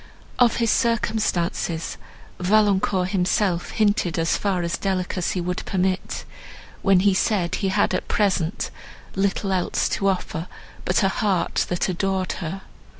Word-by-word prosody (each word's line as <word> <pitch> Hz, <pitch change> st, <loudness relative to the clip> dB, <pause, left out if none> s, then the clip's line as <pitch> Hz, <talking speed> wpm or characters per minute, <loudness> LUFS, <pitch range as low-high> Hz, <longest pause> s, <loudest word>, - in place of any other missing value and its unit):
Of 240 Hz, -3 st, +5 dB
his 230 Hz, -2 st, +2 dB
circumstances, 215 Hz, -8 st, 0 dB, 0.4 s
Valancourt 190 Hz, -1 st, +2 dB
himself 185 Hz, -1 st, +1 dB
hinted 205 Hz, -6 st, +1 dB
as 165 Hz, 0 st, +2 dB
far 190 Hz, -4 st, 0 dB
as 170 Hz, 0 st, -1 dB
delicacy 185 Hz, -1 st, -1 dB
would 180 Hz, +1 st, -3 dB
permit, 185 Hz, -1 st, -1 dB, 0.6 s
when 195 Hz, -3 st, +4 dB
he 200 Hz, 0 st, +4 dB
said 185 Hz, -3 st, +1 dB
he 195 Hz, -, 0 dB
had 190 Hz, -, +2 dB
at 185 Hz, -, -2 dB
present 190 Hz, -5 st, 0 dB, 0.4 s
little 195 Hz, 0 st, 0 dB
else 185 Hz, -2 st, +1 dB
to 195 Hz, -, 0 dB
offer 180 Hz, -3 st, -1 dB, 0.4 s
but 180 Hz, -, +2 dB
a 195 Hz, -, +4 dB
heart, 195 Hz, -3 st, 0 dB
that 175 Hz, -, 0 dB
adored 190 Hz, 0 st, -1 dB
her. 185 Hz, +3 st, -5 dB
190 Hz, 135 wpm, -23 LUFS, 180-200 Hz, 0.6 s, Of